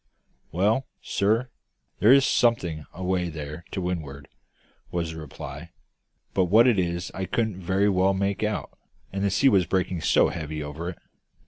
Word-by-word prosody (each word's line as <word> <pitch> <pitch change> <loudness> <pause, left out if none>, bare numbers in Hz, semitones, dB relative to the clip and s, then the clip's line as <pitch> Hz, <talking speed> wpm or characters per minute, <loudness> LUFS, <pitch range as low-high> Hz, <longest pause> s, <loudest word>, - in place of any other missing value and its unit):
"Well, 105 +10 +1 0.2
sir, 115 +5 +1 0.5
there 110 - +6
is 135 0 +7
something 85 -10 +1
away 90 -1 -1
there 75 +1 -7
to 95 - -4
windward," 75 -6 -4 0.6
was 85 -2 -2
the 80 - -8
reply, 75 -3 -8 0.6
"but 95 - +3
what 110 +7 +6
it 120 -6 +4
is 85 0 -2
I 95 - -3
couldn't 110 -3 -1
very 95 +3 +1
well 95 0 +3
make 100 +1 -1
out, 105 -1 -2 0.4
the 100 +1 0
sea 135 +8 +4
was 95 -6 +3
breaking 90 -2 -1
so - - +4
heavy 80 -1 -5
over 75 +4 -5
it. 90 - -8
95 Hz, 155 wpm, -25 LUFS, 85-100 Hz, 0.6 s, is